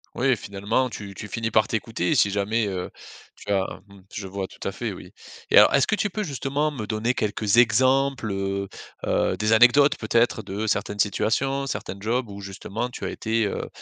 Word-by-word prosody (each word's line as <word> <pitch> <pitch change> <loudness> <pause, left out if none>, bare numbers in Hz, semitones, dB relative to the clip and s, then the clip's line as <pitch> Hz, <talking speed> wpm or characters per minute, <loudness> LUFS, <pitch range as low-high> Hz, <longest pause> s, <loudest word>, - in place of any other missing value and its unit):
Oui 130 -1 +2
finalement, 100 +6 -1
tu 100 -3 -8
tu 105 - -7
finis 110 +2 -3
par 110 0 +3
t'écouter, 110 -5 -1
si 100 - +4
jamais, 105 +3 0
heu, 95 -2 -4 0.4
tu 100 - -7
as 95 -1 +2 0.2
mmh, 100 -1 -16
je 95 -1 -5
vois 95 0 -4
tout - - -17
à - - -1
fait, - - -4
oui. - - -11 0.4
Et, - - +5
alors, - - +8
est-ce 140 - +4
que 215 - +2
tu 205 -1 -1
peux, 215 - -3
justement, 145 -2 -1
me 130 -8 -5
donner 115 +3 -1
quelques 105 +1 0
exemples, 130 +1 +3
heu 95 0 -2 0.4
heu, - - +1
des 105 +1 +2
anecdotes, 125 +5 +6
peut-être, 115 0 +1
de 100 +3 -4
certaines 105 0 -1
situations, 135 +7 +1
certains 100 -7 -5
jobs 115 +3 -1
où, 100 0 -8
justement, 100 +4 -5
tu - - -6
as - - -2
été, 110 0 -1
heu, - - -4
110 Hz, 200 wpm, -24 LUFS, 100-125 Hz, 0.4 s, alors